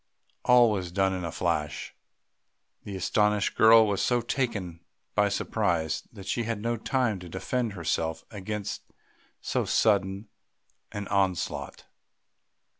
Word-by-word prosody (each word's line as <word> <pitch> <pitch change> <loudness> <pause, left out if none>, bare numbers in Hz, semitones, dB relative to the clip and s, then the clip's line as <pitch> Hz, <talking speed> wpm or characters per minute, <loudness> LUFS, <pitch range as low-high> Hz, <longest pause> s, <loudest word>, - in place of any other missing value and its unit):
All 125 -2 +6
was 95 -4 -3
done 95 +1 +1
in 90 -1 -3
a 85 - -3
flash; 80 -3 -2 0.9
the 100 - -6
astonished 105 +2 +1
girl 110 0 +7
was 100 -2 0
so 120 -1 +2
taken 115 -9 -2 0.3
by 105 0 +3
surprise 90 -6 0
that 100 -4 -11
she 110 +5 -1
had 115 -2 -2
no 115 +2 -1
time 115 -3 0
to 90 -1 -10
defend 115 +5 -2
herself 80 -2 -2
against 105 0 -4 0.6
so - - -1
sudden 100 -1 +1 0.6
an 105 -1 -5
onslaught. 95 -3 -1
100 Hz, 125 wpm, -27 LUFS, 90-110 Hz, 0.9 s, girl